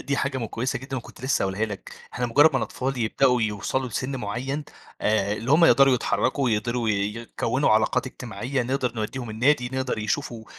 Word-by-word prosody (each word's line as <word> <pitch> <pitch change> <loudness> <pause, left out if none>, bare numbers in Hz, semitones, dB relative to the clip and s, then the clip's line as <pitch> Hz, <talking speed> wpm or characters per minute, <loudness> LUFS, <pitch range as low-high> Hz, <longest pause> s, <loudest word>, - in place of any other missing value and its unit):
دي 140 - -1
حاجة 140 -1 -1
م 115 - -3
كويسة 125 +4 -2
جدًا 135 +1 -6
وكنت 120 - -9
لسه 130 - +1
هاقولها 95 +3 0
لك، 105 -3 -7 0.2
إحنا 125 - -1
مجرد 145 +7 +6
ما - - +1
الأطفال 130 0 -3
يبدأوا 125 +2 +2
يوصلوا 110 +5 -1
لسن 130 +4 -3
معين 130 +6 -3 0.4
آآ، 105 -1 +1
اللي 115 +4 -4
هم 160 +3 +6
يقدروا 135 -4 +6
يتحركوا 125 +4 0
ويقدروا 120 0 0
ي - - +3 0.2
يكونوا 115 +3 -1
علاقات 110 +4 +2
إجتماعية، 125 +2 -3
نقدر 130 0 -1
نوديهم 115 +2 -4
النادي 125 +2 +2
نقدر 130 -3 -2
يشوفوا 110 +1 -3
125 Hz, 180 wpm, -25 LUFS, 110-135 Hz, 0.4 s, مجرد